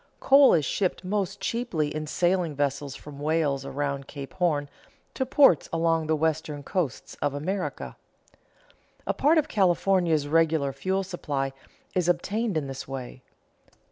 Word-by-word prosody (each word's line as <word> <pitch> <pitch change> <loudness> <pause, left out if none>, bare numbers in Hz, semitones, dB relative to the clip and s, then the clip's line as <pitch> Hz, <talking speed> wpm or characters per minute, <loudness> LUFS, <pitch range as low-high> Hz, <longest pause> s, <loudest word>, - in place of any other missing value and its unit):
Coal 275 -4 +6
is 155 -4 +1
shipped 185 +2 -1
most 200 0 -2
cheaply 175 -11 -2
in 155 0 -4
sailing 175 -1 +1
vessels 140 -1 -2
from 145 -1 -11
Wales 150 -2 0
around 140 0 -3
Cape 140 -2 -8
Horn 155 -5 0 0.5
to 260 - -2
ports 270 - +5
along 165 -1 +1
the 160 - +2
western 155 -2 -1
coasts 165 -5 -3
of 145 -1 0
America. 185 +6 -3 1.1
A - - 0
part 305 +4 +3
of 305 -1 +2
California's 180 - +2
regular 160 -3 +2
fuel 190 +8 -1
supply 145 -8 -3 0.4
is 180 -1 +1
obtained 200 +3 0
in 150 - -1
this 135 -1 -7
way. 130 -1 -7
160 Hz, 140 wpm, -26 LUFS, 145-185 Hz, 1.1 s, Coal